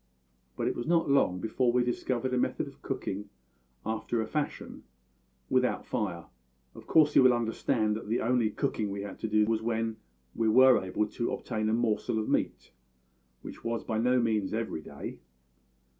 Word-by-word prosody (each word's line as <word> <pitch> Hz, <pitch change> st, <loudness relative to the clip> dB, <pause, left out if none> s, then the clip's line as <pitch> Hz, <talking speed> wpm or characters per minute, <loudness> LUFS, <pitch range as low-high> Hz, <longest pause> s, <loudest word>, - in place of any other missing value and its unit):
But -, -, -1 dB
it -, -, 0 dB
was 120 Hz, -, -4 dB
not 165 Hz, -4 st, +2 dB
long 90 Hz, -10 st, +3 dB
before 120 Hz, +4 st, +1 dB
we 125 Hz, 0 st, +2 dB
discovered 125 Hz, +1 st, -1 dB
a -, -, +2 dB
method -, -, -1 dB
of -, -, -14 dB
cooking 100 Hz, +1 st, -4 dB, 0.6 s
after 110 Hz, +2 st, -2 dB
a 110 Hz, -, 0 dB
fashion 150 Hz, +3 st, -4 dB, 0.7 s
without 125 Hz, -1 st, +1 dB
fire. 95 Hz, -7 st, -3 dB, 0.5 s
Of -, -, -13 dB
course 150 Hz, -2 st, +4 dB
you -, -, +8 dB
will 130 Hz, -1 st, +6 dB
understand 115 Hz, -1 st, 0 dB
that 110 Hz, -, -6 dB
the 115 Hz, -, +1 dB
only 120 Hz, -1 st, +2 dB
cooking 105 Hz, 0 st, -2 dB
we 100 Hz, 0 st, -4 dB
had 100 Hz, -, -8 dB
to -, -, -2 dB
do 105 Hz, 0 st, +3 dB
was 110 Hz, 0 st, 0 dB
when 115 Hz, -1 st, -1 dB, 0.4 s
we 115 Hz, -1 st, +1 dB
were 130 Hz, 0 st, +6 dB
able 95 Hz, +3 st, 0 dB
to 115 Hz, +3 st, -3 dB
obtain 110 Hz, 0 st, -2 dB
a -, -, +1 dB
morsel 115 Hz, -1 st, 0 dB
of 110 Hz, -, -1 dB
meat, -, -, -1 dB, 0.7 s
which -, -, -9 dB
was 115 Hz, 0 st, -2 dB
by 110 Hz, -1 st, -2 dB
no 125 Hz, +2 st, +3 dB
means 110 Hz, -4 st, 0 dB
every 110 Hz, -8 st, -3 dB
day. -, -, -8 dB
115 Hz, 180 wpm, -29 LUFS, 110-125 Hz, 0.7 s, you